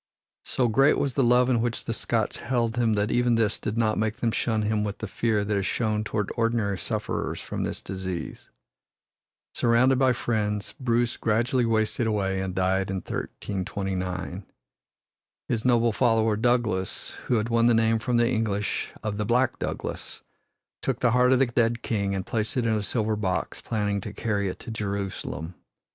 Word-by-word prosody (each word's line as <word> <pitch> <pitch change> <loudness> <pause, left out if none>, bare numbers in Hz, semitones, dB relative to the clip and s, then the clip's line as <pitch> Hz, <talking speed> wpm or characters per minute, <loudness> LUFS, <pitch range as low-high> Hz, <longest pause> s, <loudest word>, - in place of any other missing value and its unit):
So 125 - +1
great 135 +6 +4
was 140 -3 0
the 135 - +2
love 125 +1 +5
in 120 -3 +2
which 120 -1 -2
the 115 - -2
Scots 110 -1 -1
held 120 -2 -1
him 120 -2 +2
that 105 +1 0
even 120 -1 +3
this 110 -2 +1
did 110 +1 -3
not 110 -2 +2
make 110 +1 0
them 120 -2 0
shun 110 -1 0
him 105 0 +1
with 105 -1 -3
the - - -5
fear 105 0 0
that 105 0 0
is 100 -1 0
shown 110 -2 0
toward 105 -1 -2
ordinary 115 -4 0
sufferers - - -3
from - - -4
this - - -4
disease. 95 -2 -5 1.0
Surrounded 125 +2 +3
by 130 -2 +4
friends, 105 -4 -1
Bruce 120 -2 +1
gradually 115 +3 +1
wasted 110 +1 +1
away 95 -3 0
and 95 -1 -4
died 95 +1 +1
in 95 - -2
1329. 95 -1 -4 1.0
His 115 -2 -1
noble 120 -2 +3
follower, 110 -2 +2
Douglas, 115 -5 0 0.2
who 125 - +2
had 110 +1 0
won 115 0 +3
the 120 - +5
name 115 0 +3
from 120 +1 0
the 120 0 +4
English 110 -4 -1
of 105 -1 -2
"the 105 - -1
black 125 +3 +2
Douglas," - - -5 0.6
took - - -1
the 120 - +3
heart 125 +1 +4
of 130 - +5
the 135 - +4
dead 120 -1 0
king 100 -3 -1
and 95 - -3
placed 110 +1 -2
it 125 - +1
in 115 - +2
a 110 - 0
silver 110 +1 0
box, 95 -3 -2
planning 105 -3 -1
to 105 +1 -7
carry 105 -3 -1
it - - -6
to - - -7
Jerusalem. 100 -6 -4
110 Hz, 185 wpm, -26 LUFS, 100-120 Hz, 1.0 s, love